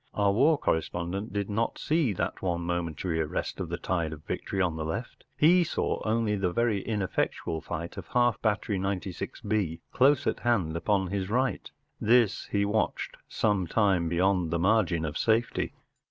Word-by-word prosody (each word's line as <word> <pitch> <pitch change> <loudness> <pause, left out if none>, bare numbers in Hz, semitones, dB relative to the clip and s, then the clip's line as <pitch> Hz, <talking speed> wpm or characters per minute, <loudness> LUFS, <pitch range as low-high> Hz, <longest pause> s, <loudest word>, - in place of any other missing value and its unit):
Our 100 -1 +3
war 140 +7 +4
corre¬ 80 - +2
spondent 90 +5 -4
did 100 -1 -2
not 110 +3 -1
see 155 -6 +1
that - - -3
one 85 -2 -1
momentary 85 -1 -2
arrest 75 - -3
of - - -3
the - - -2
tide 85 -4 -1
of 75 0 -11
victory 95 - -4
on 90 -4 +1
the 80 - -3
left; 90 +10 -5
he 175 +5 +6
saw 165 - -1
only 110 -1 +1
the 95 -3 0
very 110 -1 +1
ineffectual 95 -6 -2
fight 85 +1 -5
of - - -8
half¬ 120 -1 +2
battery 105 -2 0
96B 95 -1 -2
close 140 +2 +4
at - - 0
hand 100 -10 +1
upon 95 +2 +1
his 100 -1 -2
right 130 +3 0 0.3
This 115 -2 +3
he 100 0 +1
watched 105 +2 -1
some 100 -4 +1
time 95 -4 +2
beyond 90 0 +2
the 85 - 0
margin 90 -3 +2
of 75 0 -3
safety. 115 +1 +1
100 Hz, 170 wpm, -28 LUFS, 85-110 Hz, 0.3 s, he